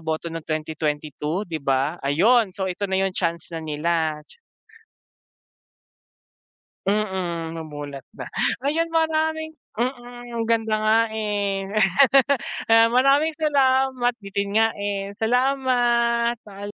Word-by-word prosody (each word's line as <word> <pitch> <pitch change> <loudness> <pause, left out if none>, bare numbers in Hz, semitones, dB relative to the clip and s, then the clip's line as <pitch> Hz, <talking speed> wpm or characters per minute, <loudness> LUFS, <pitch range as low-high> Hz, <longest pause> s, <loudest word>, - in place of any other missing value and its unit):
boto 160 +1 -3
ng 165 -1 -6
2022 155 +2 -2
di 165 -5 -5
ba? 140 +4 0
Ayun 195 - +3
so 190 - -2
ito 190 +2 -3
na 190 - 0
yung 190 - -1
chance 170 -1 -2
na 165 - -4
nila. 155 0 -1 2.6
Mm, 185 -5 -1
mamulat 145 -3 -8
na, - - -6 0.4
ayan 320 +4 +1
maraming 315 -1 0 0.2
mm, 240 -1 -4
ganda 225 -1 +1
nga, 215 +1 +3
eh. 205 -3 -2 1.2
Maraming 275 +6 +3
salamat 265 -4 +2
bitin 200 0 -2
nga, 225 0 +5
eh, 200 -1 -3
salamat. 240 -1 +2
Paalam. 205 -1 -9
205 Hz, 105 wpm, -23 LUFS, 165-245 Hz, 2.6 s, nga